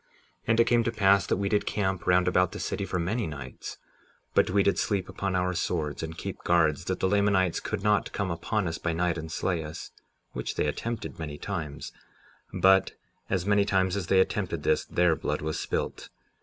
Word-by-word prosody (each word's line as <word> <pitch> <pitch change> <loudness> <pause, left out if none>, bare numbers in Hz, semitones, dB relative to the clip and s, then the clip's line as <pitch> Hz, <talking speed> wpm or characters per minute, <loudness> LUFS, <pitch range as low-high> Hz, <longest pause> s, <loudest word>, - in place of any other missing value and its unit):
57:9 - - -39 0.4
And 115 0 +3
it - - +8
came 115 0 +3
to 115 - +1
pass 100 -3 +3
that - - +1
we 100 0 -1
did 105 +1 +1
camp 95 -3 -1
round 90 0 +4
about 90 -1 +2
the - - -6
city 100 - -2
for 90 - -2
many 100 +6 -1
nights; 70 -4 -7 0.6
but - - +3
we 100 +2 +3
did 100 - +2
sleep 100 -4 0
upon 95 0 -3
our 90 0 +1
swords, 80 -3 -2
and 80 0 -6
keep - - -6
guards, 80 -4 +2
that - - -2
the - - +2
Lamanites 95 -3 +2
could 105 -2 -4
not 105 -1 +2
come 100 -3 -2
upon 100 +4 -1
us 80 0 -3
by 85 - -1
night 85 0 0
and 80 0 -7
slay 85 -1 -1
us, 75 +1 -8 0.4
which - - -4
they - - +1
attempted 115 +10 -4
many 75 -2 -5
times; 80 -5 -5 0.6
but 95 0 +4 0.4
as 95 -2 0
many 100 0 +4
times 95 -2 +1
as 95 -4 -3
they 95 - +4
attempted 95 - 0
this - - +2
their 90 -2 +2
blood 75 0 -3
was 80 0 -2
spilt. - - -3
95 Hz, 210 wpm, -28 LUFS, 80-100 Hz, 0.6 s, it